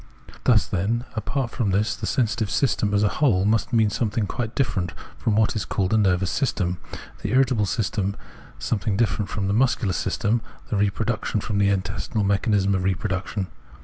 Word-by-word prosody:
Thus - - +5
then, 115 +7 -1
apart 120 +3 -2
from 115 -6 -1
this, 100 +3 +1
the - - -4
sensitive 110 -4 0
system 110 -5 +1
as 105 0 +2
a - - +5
whole 100 -6 +2
must 110 +2 +1
mean 110 -3 +3
something 110 -1 0
quite 115 +2 -4
different 95 -9 -1 0.2
from 110 - 0
what 110 +2 +2
is 105 - -1
called 95 +1 -1
a - - +5
nervous 95 -2 +2
system, 90 -9 0 0.4
the - - -2
irritable 125 -5 +3
system 100 -1 -1 0.4
some 110 - -1
thing 100 -1 -1
different 105 -2 0
from 100 -2 -2
the 100 - +1
muscular 115 -4 +2
system, 110 +5 0 0.3
the - - +1
reproduc 105 +3 0
tive 105 - 0
from 100 -2 -1
the 100 0 +4
intestinal 100 +2 -1
mechanism 100 0 +2
of 95 -1 0
reproduction. 95 +1 -1
105 Hz, 180 wpm, -24 LUFS, 100-115 Hz, 0.4 s, Thus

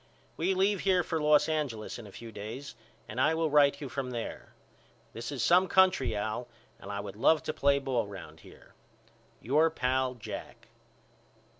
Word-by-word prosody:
We 185 +4 0
leave 195 +1 +2
here 185 -2 +2
for 160 -1 -2
Los 150 0 +4
Angeles 140 -9 -3
in 110 - -10
a - - -12
few 115 +3 -10
days 110 +7 -7 0.3
and 115 +5 -3
I 160 +4 +3
will 160 -2 0
write 140 -1 +4
you 145 - -5
from 130 +1 -4
there. 120 -2 -6 0.6
This 115 +4 -6
is 140 - -2
some 180 +2 +5
country 185 - +3
Al 110 +4 -3 0.3
and - - -8
I 100 - -3
would 100 -1 -7
love 150 +8 +3
to - - -3
play 140 0 +3
ball 130 -5 -1
round 80 -6 -10
here. - - -17 0.7
Your 150 +7 +3
Pal, 130 -2 0
JACK. 115 - -9
135 Hz, 175 wpm, -30 LUFS, 115-160 Hz, 0.7 s, some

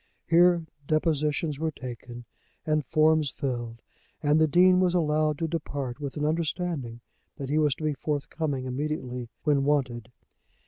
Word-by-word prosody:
Here 170 0 +4 0.2
depositions 155 -1 0
were 160 0 0
taken 120 -3 -8 0.4
and 155 -1 +1
forms 155 +2 +3
filled, 120 -4 -4 0.4
and 150 +1 +4
the 160 - +5
Dean 180 +4 +5
was 180 -1 +2
allowed 155 -2 +2
to 165 - -1
depart 145 -5 -4
with 140 0 -5
an 150 - 0
understanding 155 -6 -2 0.4
that 135 -1 -5
he 150 +2 +2
was 150 -3 +2
to - - -9
be 155 -1 +1
forthcoming 145 -1 -3
immediately 125 -3 -3
when 145 -3 +2
wanted. 125 -5 0
150 Hz, 145 wpm, -27 LUFS, 130-160 Hz, 0.4 s, the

